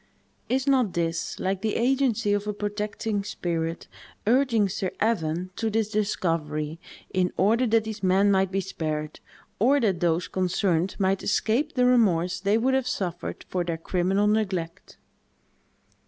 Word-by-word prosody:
Is 260 Hz, +1 st, +1 dB
not 260 Hz, -8 st, +2 dB
this 165 Hz, -1 st, -2 dB
like 190 Hz, 0 st, -1 dB
the 215 Hz, 0 st, -1 dB
agency 240 Hz, -4 st, +2 dB
of 205 Hz, 0 st, -1 dB
a 210 Hz, -, -1 dB
protecting 205 Hz, 0 st, -3 dB
spirit, 165 Hz, -4 st, -3 dB, 0.4 s
urging 230 Hz, -3 st, +3 dB
Sir 190 Hz, 0 st, -2 dB
Evan 180 Hz, -5 st, 0 dB
to 225 Hz, -, 0 dB
this 215 Hz, -1 st, 0 dB
discovery, 165 Hz, -7 st, -1 dB, 0.3 s
in 180 Hz, -1 st, +1 dB
order 230 Hz, +6 st, +3 dB
that 225 Hz, 0 st, +3 dB
these 220 Hz, -1 st, -6 dB
men 195 Hz, +2 st, +3 dB
might 190 Hz, -1 st, +2 dB
be 195 Hz, 0 st, 0 dB
spared, 155 Hz, -4 st, -4 dB, 0.4 s
or 265 Hz, +7 st, +4 dB
that 195 Hz, -8 st, +1 dB
those 175 Hz, 0 st, +1 dB
concerned 185 Hz, -1 st, 0 dB
might 190 Hz, -1 st, +1 dB
escape 230 Hz, +7 st, 0 dB
the 250 Hz, -1 st, +3 dB
remorse 190 Hz, -8 st, +3 dB
they 200 Hz, +3 st, +2 dB
would 255 Hz, +3 st, +1 dB
have 265 Hz, -1 st, +1 dB
suffered 180 Hz, -7 st, -4 dB
for 180 Hz, -1 st, -1 dB
their 170 Hz, -1 st, -3 dB
criminal 185 Hz, +4 st, 0 dB
neglect? 195 Hz, -5 st, -1 dB
200 Hz, 150 wpm, -26 LUFS, 175-220 Hz, 0.4 s, or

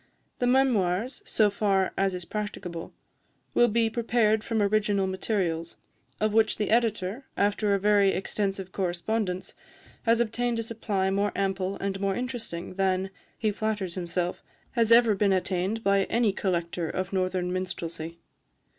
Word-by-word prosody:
The 245 Hz, -, +1 dB
memoirs, 245 Hz, -4 st, +2 dB
so 210 Hz, -2 st, +3 dB
far 195 Hz, -2 st, +1 dB
as 195 Hz, -1 st, +1 dB
is 180 Hz, -1 st, -6 dB
practicable, 185 Hz, -5 st, -5 dB, 0.6 s
will 240 Hz, -, +5 dB
be 230 Hz, 0 st, +2 dB
prepared 220 Hz, -1 st, +2 dB
from 225 Hz, -1 st, -1 dB
original 205 Hz, -1 st, +2 dB
materials, 185 Hz, -4 st, -2 dB, 0.4 s
of 215 Hz, -1 st, +1 dB
which 220 Hz, 0 st, +3 dB
the 210 Hz, -1 st, -1 dB
Editor, 225 Hz, +1 st, +1 dB
after 205 Hz, 0 st, +2 dB
a -, -, 0 dB
very 205 Hz, 0 st, +4 dB
extensive 195 Hz, 0 st, -2 dB
correspondence, 185 Hz, +1 st, -2 dB, 0.5 s
has 230 Hz, 0 st, +3 dB
obtained 235 Hz, +1 st, 0 dB
a 230 Hz, -, -1 dB
supply 210 Hz, -4 st, -1 dB
more 200 Hz, +1 st, +1 dB
ample 195 Hz, 0 st, -1 dB
and 195 Hz, -1 st, -3 dB
more 195 Hz, -1 st, 0 dB
interesting 245 Hz, -10 st, -5 dB
than, 190 Hz, 0 st, 0 dB, 0.3 s
he 215 Hz, -2 st, +1 dB
flatters 205 Hz, -4 st, -2 dB
himself, 175 Hz, 0 st, -2 dB, 0.3 s
has 230 Hz, -3 st, +2 dB
ever 230 Hz, -2 st, +7 dB
been 200 Hz, 0 st, +2 dB
attained 185 Hz, +4 st, -1 dB
by 200 Hz, -1 st, +3 dB
any 230 Hz, -4 st, +2 dB
collector 170 Hz, -3 st, -1 dB
of 185 Hz, +1 st, -3 dB
northern 185 Hz, -1 st, 0 dB
minstrelsy. 170 Hz, -3 st, -4 dB
200 Hz, 145 wpm, -27 LUFS, 185-220 Hz, 0.6 s, ever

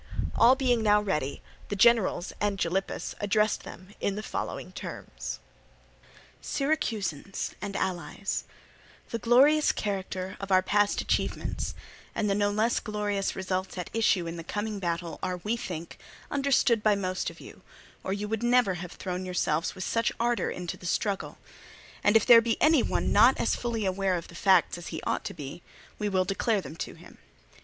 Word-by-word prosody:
All 245 Hz, +3 st, +6 dB
being 250 Hz, -3 st, +2 dB
now 210 Hz, -1 st, +5 dB
ready, 155 Hz, -9 st, -2 dB, 0.3 s
the 205 Hz, -, -1 dB
generals 220 Hz, -4 st, +3 dB
and 205 Hz, -1 st, +1 dB
Gylippus 190 Hz, +2 st, -2 dB
addressed 210 Hz, +1 st, +2 dB
them 185 Hz, +3 st, -11 dB
in 200 Hz, -, -1 dB
the 215 Hz, -, -5 dB
following -, -, -4 dB
terms: -, -, -6 dB, 1.0 s
"Syracusans 215 Hz, -, -2 dB
and 200 Hz, -1 st, -4 dB
allies, 185 Hz, +2 st, -2 dB, 0.7 s
the 230 Hz, -, -2 dB
glorious 275 Hz, +7 st, +5 dB
character 190 Hz, -1 st, -3 dB
of 195 Hz, -1 st, -6 dB
our 185 Hz, 0 st, +5 dB
past 205 Hz, +1 st, +2 dB
achievements -, -, -2 dB, 0.4 s
and 210 Hz, -, 0 dB
the 200 Hz, -, +2 dB
no 205 Hz, 0 st, +2 dB
less 215 Hz, +3 st, +1 dB
glorious 205 Hz, -2 st, -2 dB
results 185 Hz, 0 st, -3 dB
at 180 Hz, -, -5 dB
issue 210 Hz, -6 st, +2 dB
in 165 Hz, +1 st, -5 dB
the 165 Hz, -, -6 dB
coming 205 Hz, +3 st, -3 dB
battle 170 Hz, -2 st, -3 dB
are, 185 Hz, -1 st, -2 dB
we 210 Hz, +6 st, -1 dB
think, 170 Hz, -7 st, -6 dB, 0.3 s
understood 270 Hz, -5 st, +3 dB
by 210 Hz, -1 st, +4 dB
most 185 Hz, -2 st, -2 dB
of -, -, -13 dB
you, -, -, -12 dB, 0.4 s
or -, -, -3 dB
you 205 Hz, +1 st, -2 dB
would 220 Hz, +1 st, -2 dB
never 240 Hz, -4 st, +3 dB
have 175 Hz, 0 st, -7 dB
thrown 180 Hz, -1 st, -4 dB
yourselves 175 Hz, -3 st, -1 dB
with 185 Hz, -, -5 dB
such 230 Hz, +3 st, +1 dB
ardour 240 Hz, 0 st, +1 dB
into 180 Hz, -2 st, -5 dB
the 180 Hz, -, -8 dB
struggle; 200 Hz, +2 st, -1 dB, 0.7 s
and 205 Hz, +2 st, +6 dB
if 220 Hz, -, +1 dB
there 235 Hz, -1 st, +9 dB
be 230 Hz, 0 st, -1 dB
any 310 Hz, -3 st, +5 dB
one -, -, 0 dB
not 235 Hz, +5 st, +6 dB
as -, -, +1 dB
fully 230 Hz, -3 st, -2 dB
aware 190 Hz, 0 st, +1 dB
of 170 Hz, -, -5 dB
the -, -, -12 dB
facts 180 Hz, -1 st, +3 dB
as 175 Hz, -, -9 dB
he -, -, -4 dB
ought -, -, -1 dB
to -, -, -5 dB
be, 145 Hz, +2 st, -7 dB, 0.4 s
we 210 Hz, -1 st, 0 dB
will 185 Hz, -2 st, +2 dB
declare 205 Hz, +3 st, +1 dB
them 155 Hz, -3 st, -8 dB
to -, -, -6 dB
him. -, -, -16 dB
200 Hz, 175 wpm, -28 LUFS, 185-225 Hz, 1.0 s, there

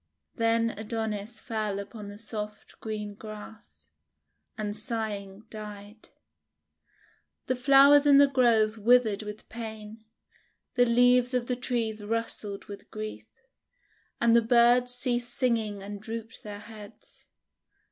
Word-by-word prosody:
Then 230 Hz, 0 st, +1 dB
Adonis 220 Hz, 0 st, -4 dB
fell 215 Hz, -4 st, -3 dB
upon 205 Hz, +1 st, -8 dB
the 205 Hz, 0 st, -9 dB
soft 210 Hz, -1 st, -5 dB
green 210 Hz, -2 st, -5 dB
grass, 215 Hz, +1 st, -12 dB, 0.7 s
and 210 Hz, -1 st, -3 dB
sighing 210 Hz, -2 st, -4 dB
died. 210 Hz, 0 st, -9 dB, 1.4 s
The 255 Hz, -, 0 dB
flowers 280 Hz, +3 st, +6 dB
in 280 Hz, -1 st, +7 dB
the 285 Hz, -, +8 dB
Grove 230 Hz, -5 st, +2 dB
withered 225 Hz, -2 st, +4 dB
with 210 Hz, 0 st, -9 dB
pain, 220 Hz, -1 st, -8 dB, 0.7 s
the 245 Hz, -, +4 dB
leaves 245 Hz, +1 st, +4 dB
of 245 Hz, -1 st, 0 dB
the 250 Hz, -, -1 dB
trees 230 Hz, -4 st, -2 dB
rustled 210 Hz, -2 st, -2 dB
with 200 Hz, -2 st, -11 dB
grief, 215 Hz, 0 st, -7 dB, 0.9 s
and 235 Hz, 0 st, +4 dB
the 235 Hz, -, +6 dB
birds 240 Hz, +2 st, +4 dB
ceased 245 Hz, -1 st, -1 dB
singing 220 Hz, -6 st, 0 dB
and 205 Hz, 0 st, -7 dB
drooped 225 Hz, +1 st, -7 dB
their 205 Hz, -1 st, -8 dB
heads. 210 Hz, -2 st, -14 dB
220 Hz, 120 wpm, -28 LUFS, 210-240 Hz, 1.4 s, the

